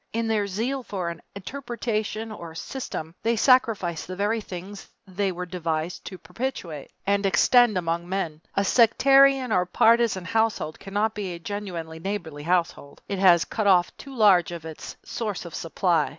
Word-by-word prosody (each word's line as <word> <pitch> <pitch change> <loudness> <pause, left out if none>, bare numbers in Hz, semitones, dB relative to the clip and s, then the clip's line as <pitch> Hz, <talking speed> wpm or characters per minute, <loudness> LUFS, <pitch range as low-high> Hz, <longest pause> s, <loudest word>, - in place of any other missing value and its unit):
In 230 0 -1
their 215 -2 +1
zeal 235 +8 -2
for 190 -7 -4
an 170 0 -8
interpretation 225 -1 -4
or 170 -6 -9
system 165 - -6
they 230 +1 +1
sacrifice 220 - +3
the 185 +3 -7
very 210 +4 0
things 195 +1 -9 0.2
they 195 0 -1
were 180 0 -5
devised 170 -1 -3
to 185 - -7
perpetuate 180 - -5 0.2
and 200 0 +1
extend 210 +4 +4
among 170 0 -2
men. 165 -5 -3
A 200 - +2
sectarian 270 +3 +5
or 180 -3 +2
partisan 225 -1 +3
household 220 -6 0
cannot 205 +3 -1
be 200 -4 -4
a - - -9
genuinely 170 -4 -6
neighborly 165 -5 -5
household. 165 -3 -1
It 200 -2 -3
has 175 -3 +5
cut 215 -2 -2
off 180 -3 +4
too 275 -1 -11
large 195 -7 +5
a - - -4
part - - -24
of 160 - -6
its 155 - -9
source 210 -6 -4
of 170 - -9
supply. 170 -2 0
195 Hz, 170 wpm, -25 LUFS, 170-225 Hz, 0.2 s, sectarian